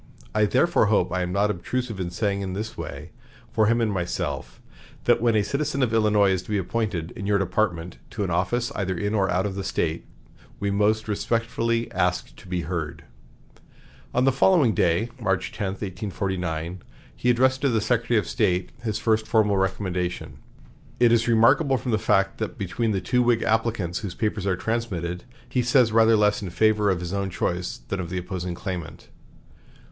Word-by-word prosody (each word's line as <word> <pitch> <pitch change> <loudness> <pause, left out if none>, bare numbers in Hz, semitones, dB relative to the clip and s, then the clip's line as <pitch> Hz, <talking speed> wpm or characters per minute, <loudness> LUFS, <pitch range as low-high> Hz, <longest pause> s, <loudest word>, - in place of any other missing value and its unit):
I 105 0 +3
therefore 130 +3 +3
hope 95 -4 +2
I 90 0 0
am 90 0 -2
not 100 +2 +2
obtrusive 115 +3 -3
in 90 -2 -2
saying 100 +2 -1
in 95 -1 -3
this 105 +3 -4
way, 70 +4 -7 0.4
for 110 -1 +3
him 115 +2 +3
and 110 -2 +1
myself, 85 -8 -3 0.4
that - - +3
when 115 -1 +3
a 105 - +3
citizen 140 +4 -1
of 115 -3 0
Illinois 105 -3 +4
is 95 -2 0
to - - -16
be 105 - +1
appointed, 95 -4 -2
in 100 -4 -6
your 100 0 +3
department, 90 - -1
to - - -3
an - - -2
office, 120 0 0
either 95 -2 -2
in 105 +2 -1
or 100 -3 +2
out 90 +2 +1
of 100 - -2
the 100 0 -4
State, 85 -3 -2 0.5
we 100 0 -1
most 105 +2 +1
respectfully 115 +2 -1
ask 90 0 -1
to - - -14
be 90 -1 -2
heard." 80 -1 -4 1.1
On 125 +1 +2
the 135 - +5
following 135 - +4
day, 90 +7 +1
March 95 -3 0
10, 95 -2 -3
1849, 95 -4 -4 0.3
he 125 - 0
addressed 130 +2 +3
to 140 - +2
the 115 -3 +2
Secretary 115 +1 +1
of 105 - 0
State 95 -4 0
his 110 -2 -1
first 110 -1 +1
formal 110 -3 +3
recommendation. 90 -2 -2 0.6
It 120 -1 +5
is 115 0 +3
remarkable 120 +5 +4
from 120 +1 -3
the 110 - +2
fact 100 -1 +1
that 145 - -4
between 110 +3 -1
the 95 -2 -1
two 125 -1 +1
Whig 120 -1 +2
applicants 110 -6 0
whose 100 -4 -6
papers 105 -3 -1
are 95 - +2
transmitted, 90 -5 -3 0.2
he 125 0 0
says 125 -2 +4
rather 115 0 +5
less 105 0 +2
in 95 - -4
favor 105 +2 +2
of 90 -2 0
his 90 +1 -4
own 100 -1 -1
choice 90 0 -2
than 100 - -2
of 85 -2 -4
the 95 - -3
opposing 90 -1 -4
claimant. 90 -3 -6
105 Hz, 190 wpm, -25 LUFS, 90-115 Hz, 1.1 s, the